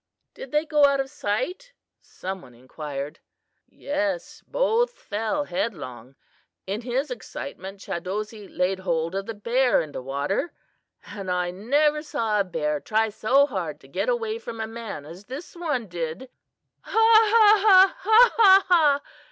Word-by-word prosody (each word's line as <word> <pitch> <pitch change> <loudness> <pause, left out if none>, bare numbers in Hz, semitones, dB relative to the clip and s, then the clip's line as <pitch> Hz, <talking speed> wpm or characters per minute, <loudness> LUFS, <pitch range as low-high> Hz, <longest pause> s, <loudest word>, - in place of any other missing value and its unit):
"Did - - -9
they 300 +1 +1
go 300 -2 +4
out 280 -1 +2
of 270 0 -2
sight?" 295 - -3 0.3
some 190 0 -7
one 125 -2 -16
inquired. 140 +3 -7 0.5
"Yes, 290 -1 -3
both 485 0 +1
fell 225 - -3
headlong. 135 - -5 0.5
In 200 +4 -3
his 255 +3 -2
excitement 195 - -7
Chadozee 205 +4 -5
laid 185 +1 -1
hold 170 -2 -1
of 195 0 -3
the 225 - -5
bear 245 +5 +2
in 155 - -4
the - - -6
water, 140 - -2 0.5
and 195 -3 -7
I 180 -1 0
never 290 +10 +1
saw 230 -9 -1
a - - +3
bear 150 -5 -2
try 220 +5 0
so 265 +7 +3
hard - - -4
to - - -17
get - - -2
away 455 -2 -1
from 230 - -8
a 220 - -2
man 225 -9 -7
as 175 +6 -12
this 265 - -9
one 300 -9 -2
did." 175 +8 -5 0.5
"Ha, - - -6
ha, 440 -2 +6
ha! 385 -1 +6 0.3
ha, - - -4
ha, 390 -3 +7
ha!" 300 -6 +4
225 Hz, 155 wpm, -24 LUFS, 180-300 Hz, 0.5 s, ha